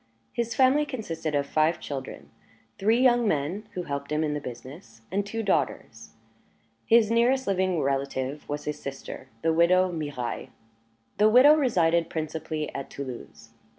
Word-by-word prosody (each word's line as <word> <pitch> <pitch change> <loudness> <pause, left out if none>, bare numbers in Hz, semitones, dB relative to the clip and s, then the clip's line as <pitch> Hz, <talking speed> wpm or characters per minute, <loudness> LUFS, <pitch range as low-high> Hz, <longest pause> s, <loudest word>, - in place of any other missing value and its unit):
His 235 -1 -2
family 270 +3 +4
consisted 165 - -4
of 140 0 +1
five 155 +3 +1
children 135 -2 -7 0.5
three 220 +4 +3
young 240 -3 +4
men, 175 +6 -2
who 180 - -3
helped 140 -2 -5
him 150 +1 +1
in 150 -1 -1
the 150 - -3
business, 125 -1 -10
and 200 +2 0
two 225 +3 -4
daughters. 200 - -2 0.7
His 225 -2 +5
nearest 250 +3 +3
living 185 -3 +1
relative 135 0 -2
was 145 0 -4
his 150 - -4
sister, 135 -1 -7 0.2
the 165 - +2
widow 180 +2 +4
Mirailhe. 145 -7 -4 0.7
The 210 +1 +6
widow 255 +6 +8
resided 170 - +2
principally 155 -1 -4
at 135 - -6
Toulouse. 130 -4 -8
165 Hz, 150 wpm, -26 LUFS, 145-220 Hz, 0.7 s, widow